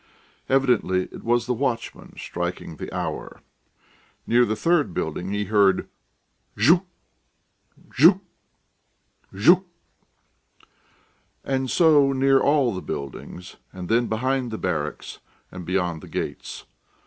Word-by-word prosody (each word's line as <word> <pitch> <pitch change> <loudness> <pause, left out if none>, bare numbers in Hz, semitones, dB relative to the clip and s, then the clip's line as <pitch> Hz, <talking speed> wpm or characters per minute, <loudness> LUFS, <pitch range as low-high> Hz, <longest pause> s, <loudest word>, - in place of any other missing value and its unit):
Evidently 120 -9 +2
it - - -11
was 120 0 +1
the 125 - 0
watchman 120 -2 -4
striking 90 -2 -5
the - - -7
hour. - - -5 0.9
Near 120 +1 +4
the 110 - -1
third 150 - +1
building 90 +4 -3
he 105 0 -1
heard: 100 -2 +2 0.7
"Zhuk... 170 - +4 1.1
zhuk... 170 +8 +6 1.1
zhuk...." 175 - +4 1.8
And 130 -1 -1
so 150 -4 +4
near 135 0 +3
all 140 -5 +2
the 95 - -5
buildings, 70 +6 -7
and 90 -1 -8
then 115 +1 +2
behind 130 +3 -1
the 110 - -5
barracks 75 -5 -4 0.3
and 90 -1 -8
beyond 90 -3 -1
the - - -11
gates. - - -5
115 Hz, 110 wpm, -23 LUFS, 95-135 Hz, 1.8 s, zhuk